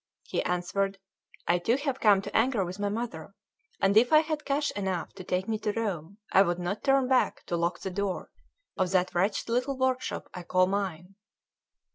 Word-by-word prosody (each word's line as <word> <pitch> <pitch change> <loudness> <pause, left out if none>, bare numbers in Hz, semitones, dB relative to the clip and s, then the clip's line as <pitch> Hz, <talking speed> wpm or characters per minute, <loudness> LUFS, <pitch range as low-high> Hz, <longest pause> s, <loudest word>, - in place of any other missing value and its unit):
He - - -2
answered: 195 +3 -1 0.5
"I 175 +1 +3
too 230 +8 +2
have 275 -2 -2
come 200 -3 +5
to - - -7
anger 225 -4 +2
with 180 +3 -7
my 205 0 0
mother; 230 +4 -5 0.4
and 195 +1 +3
if 235 +3 +5
I 310 0 +7
had 310 -1 -4
cash 285 +1 0
enough 190 -4 -3
to 190 - -9
take 180 +1 -1
me 220 -1 -1
to 210 - -1
Rome, 200 -5 -3
I 190 - +6
would 175 -3 +2
not 180 +4 -3
turn 270 -2 +3
back 260 -1 +1
to 175 - -2
lock 170 +1 -1
the 190 - -4
door 195 0 -3 0.4
of 185 -1 0
that 185 -1 +1
wretched 195 +4 0
little 250 +3 0
workshop 260 -1 -1
I 180 - -6
call 185 +1 +3
mine." 190 -1 -3
200 Hz, 195 wpm, -28 LUFS, 180-245 Hz, 0.5 s, I